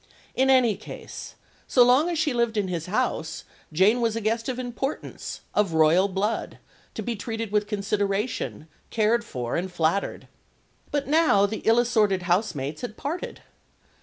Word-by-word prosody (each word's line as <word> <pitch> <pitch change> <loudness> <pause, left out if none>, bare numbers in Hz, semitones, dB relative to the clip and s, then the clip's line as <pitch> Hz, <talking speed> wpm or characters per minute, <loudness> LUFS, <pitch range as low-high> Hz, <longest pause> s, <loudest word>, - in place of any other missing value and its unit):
In 265 +1 +2
any 250 -5 +5
case, 215 - -9 0.3
so 250 - +6
long 260 +7 +4
as 340 - -1
she 305 -3 +1
lived 235 -2 0
in 200 -3 0
his 170 -2 -3
house, 195 -6 -1 0.3
Jane 200 +9 +4
was 225 -2 +1
a 230 - -2
guest 225 +3 -1
of 250 - -2
importance, 255 +3 -5
of 205 -5 +1
royal 160 +5 +5
blood, 200 +3 -2 0.4
to - - -4
be 240 -1 -2
treated 225 0 -4
with 210 0 +1
consideration, 205 -3 -2 0.2
cared 225 +2 +2
for, 125 - -4
and 180 +2 -2
flattered. 175 +3 -1 0.6
But 285 -1 -1
now 300 -10 +4
the 215 +2 -4
ill 225 +1 +5
assorted 215 -6 +2
house 180 +2 +1
mates 140 +2 -4
had 235 -3 -6
parted. 325 +6 -5
215 Hz, 165 wpm, -25 LUFS, 190-245 Hz, 0.6 s, so